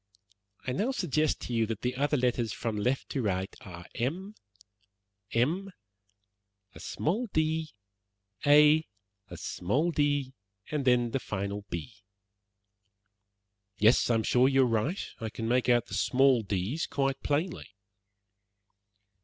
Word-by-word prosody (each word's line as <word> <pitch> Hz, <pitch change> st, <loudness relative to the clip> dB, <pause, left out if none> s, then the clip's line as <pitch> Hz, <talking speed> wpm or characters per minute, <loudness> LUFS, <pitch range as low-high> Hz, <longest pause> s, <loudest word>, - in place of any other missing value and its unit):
"I 130 Hz, -, -1 dB
now 205 Hz, -, 0 dB
suggest 155 Hz, -, 0 dB
to 125 Hz, -, -5 dB
you 115 Hz, -1 st, +1 dB
that 110 Hz, -1 st, -4 dB
the 125 Hz, +1 st, -1 dB
other 145 Hz, +3 st, +1 dB
letters 120 Hz, -3 st, 0 dB
from 115 Hz, -1 st, -3 dB
left 125 Hz, +6 st, -1 dB
to 135 Hz, -, -2 dB
right 95 Hz, -3 st, -2 dB
are, 90 Hz, -7 st, -10 dB
M, 175 Hz, -, -3 dB, 1.0 s
M, 170 Hz, +12 st, 0 dB, 1.0 s
a -, -, -12 dB
small 215 Hz, +11 st, -2 dB
d, 160 Hz, -3 st, 0 dB, 0.7 s
A, 150 Hz, +2 st, +6 dB, 0.4 s
a 90 Hz, -, -9 dB
small 130 Hz, -, -1 dB
d, 145 Hz, -3 st, 0 dB, 0.4 s
and 150 Hz, -3 st, -1 dB
then 120 Hz, -2 st, +3 dB
the 135 Hz, -, 0 dB
final 100 Hz, -2 st, -4 dB
B." 95 Hz, +6 st, -6 dB, 1.8 s
"Yes, 110 Hz, +5 st, +4 dB
I 120 Hz, -, +3 dB
am 110 Hz, -, +1 dB
sure 125 Hz, +4 st, +4 dB
that -, -, -3 dB
you 135 Hz, 0 st, +5 dB
are -, -, +4 dB
right. 120 Hz, -, 0 dB
I 110 Hz, -, -4 dB
can 115 Hz, +1 st, -5 dB
make 125 Hz, +1 st, +2 dB
out 120 Hz, -1 st, +4 dB
the -, -, -11 dB
two -, -, 0 dB
small 135 Hz, -2 st, +4 dB
d's 100 Hz, -, -2 dB
quite 135 Hz, -1 st, -1 dB
plainly." 155 Hz, +5 st, -1 dB
130 Hz, 145 wpm, -29 LUFS, 115-150 Hz, 1.8 s, A